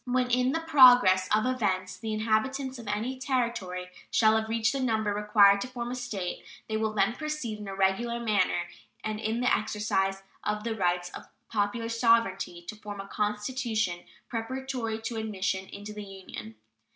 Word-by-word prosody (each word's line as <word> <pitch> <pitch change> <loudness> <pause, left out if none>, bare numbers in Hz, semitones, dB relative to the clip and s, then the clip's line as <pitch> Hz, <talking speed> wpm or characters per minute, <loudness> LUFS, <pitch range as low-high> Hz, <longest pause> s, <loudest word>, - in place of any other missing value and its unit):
When 250 0 +1
in 250 +1 +3
the 325 - 0
progress 245 -12 +7
of 215 +2 +3
events 190 -8 0
the 225 -1 -5
inhabitants 245 +5 0
of 230 - -10
any 225 +6 -2
Territory 235 -9 -2 0.2
shall 220 -1 +4
have 220 0 0
reached 225 +1 +1
the 275 - -1
number 220 -5 +1
required 205 -1 +5
to 250 - -3
form 245 -1 -5
a - - -3
State, 215 -8 -4 0.2
they 220 - -2
will 220 0 0
then 200 +2 +2
proceed 305 -7 -4
in 210 - -7
a 195 - -5
regular 195 +5 +1
manner 205 -6 +1 0.4
and 215 0 -3
in 220 +2 -1
the 250 - +4
exercise 195 -3 -1 0.2
of 210 0 -1
the 225 -1 -2
rights 180 -2 0
of - - -9 0.2
popular 220 +2 0
sovereignty 230 -6 +2
to 215 - -5
form 205 -1 -8
a 195 - -6
constitution 210 -2 -1 0.3
preparatory 240 -1 -3
to 230 0 -3
admission 190 -3 -2
into 205 +1 -8
the 210 0 -6
Union. 185 - -9
220 Hz, 175 wpm, -28 LUFS, 200-240 Hz, 0.4 s, progress